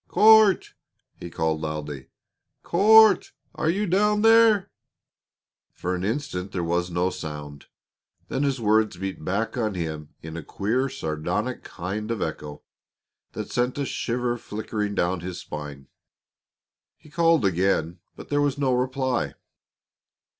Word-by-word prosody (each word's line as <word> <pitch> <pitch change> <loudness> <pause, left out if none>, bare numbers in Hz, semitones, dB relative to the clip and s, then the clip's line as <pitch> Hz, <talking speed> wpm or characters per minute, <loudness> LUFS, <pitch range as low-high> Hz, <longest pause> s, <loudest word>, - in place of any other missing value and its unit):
"Court!" 215 -3 +5 0.5
he 85 - -7
called 80 -1 -1
loudly. 75 -3 -5 0.6
"Court 215 +2 +5 0.2
are 155 - -1
you 200 +5 0
down 210 +3 +2
there?" 225 -3 +5 1.0
For 90 - -3
an 90 0 -3
instant 100 -5 -3
there 90 - -2
was 85 +1 -1
no 90 +1 0
sound. 75 -3 -8 0.6
Then 135 - -2
his 140 -3 0
words 110 -3 +2
beat 95 +1 -5
back 105 +7 -2
on 110 -4 -1
him 80 -3 -4
in 80 0 -7
a 85 - -5
queer, 115 - -1
sardonic 90 - -3
kind 105 +5 -5
of 115 -2 -2
echo 75 -4 -5 0.7
that - - -6
sent 125 +2 0
a 140 - -1
shiver 120 -1 -2
flickering 105 -1 -4
down 90 0 0
his 90 +1 -6
spine. 75 -2 -8 1.1
He 150 - -19
called 165 -6 +3
again, 90 -2 0 0.2
but - - -10
still - - -28
there - - +3
was 145 -1 0
no 135 -3 +1
reply. 130 0 -1
105 Hz, 140 wpm, -25 LUFS, 85-140 Hz, 1.1 s, Court